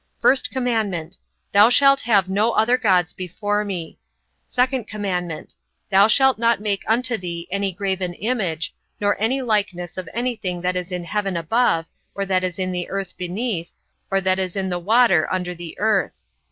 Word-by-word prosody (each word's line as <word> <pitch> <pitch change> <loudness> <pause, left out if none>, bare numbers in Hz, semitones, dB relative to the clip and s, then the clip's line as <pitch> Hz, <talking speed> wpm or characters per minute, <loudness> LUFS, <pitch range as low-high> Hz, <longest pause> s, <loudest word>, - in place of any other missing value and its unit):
1st 260 -1 +4
commandment: 215 -10 -2 0.3
Thou 205 +3 +7
shalt 275 +2 +5
have 205 -5 +3
no 210 +5 +1
other 230 +3 +3
gods 185 -8 +2
before 205 +3 -2
me. 180 -6 -6 0.5
2nd 250 -2 0
commandment: 180 -6 -4 0.4
Thou 195 +2 +6
shalt 265 +1 +4
not 230 -1 +3
make 205 -2 -1
unto 245 +1 +1
thee 170 -2 -6
any 200 0 0
graven 190 -2 -2
image, 195 -9 -2 0.3
or 205 0 +2
any 260 +4 +1
likeness 200 -7 -1
of 180 -3 -7
any 245 +1 -1
thing 180 -5 -4
that 180 +1 -1
is 180 +1 -3
in 180 -1 -3
heaven 195 +1 -2
above, 165 -1 +1 0.3
or 200 - -1
that 185 -1 +1
is 180 -2 -2
in 185 -1 -1
the 180 -1 -4
earth 195 -2 -4
beneath, 180 0 -3 0.4
or 195 - +2
that 190 0 +1
is 185 -2 -2
in 190 -1 -1
the 180 -1 -2
water 200 -3 +3
under 180 -1 -2
the 170 -1 -9
earth. 205 - +1
195 Hz, 175 wpm, -22 LUFS, 180-225 Hz, 0.5 s, Thou